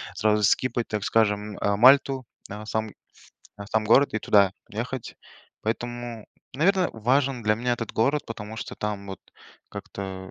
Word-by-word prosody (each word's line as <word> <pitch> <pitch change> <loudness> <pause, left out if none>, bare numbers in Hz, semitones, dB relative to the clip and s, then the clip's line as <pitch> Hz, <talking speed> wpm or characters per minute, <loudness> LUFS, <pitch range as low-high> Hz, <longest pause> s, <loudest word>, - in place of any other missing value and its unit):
сразу 105 -1 +2
скипать, 120 +3 +1
так 105 -2 -2
скажем, 105 -2 +1
э, 100 0 0
Мальту, 130 +2 +5 0.2
да, 105 +2 -7
сам 110 0 -2 0.7
да, 100 - -7
сам 110 +1 0
город, 125 +5 +4
и - - +1
туда 100 -3 +4 0.2
ехать. 120 +3 -5 0.5
Поэтому, 120 0 -4 0.3
наверное, 180 +6 +3
важен 130 +3 +1
для 105 0 +3
меня 120 +3 -1
этот 115 -2 -6
город, 140 +6 +1
потому 110 -1 -7
что - - -6
там 105 -1 -4
вот, 95 - -6 0.5
как-то 95 -1 -7
110 Hz, 150 wpm, -25 LUFS, 105-125 Hz, 0.7 s, Мальту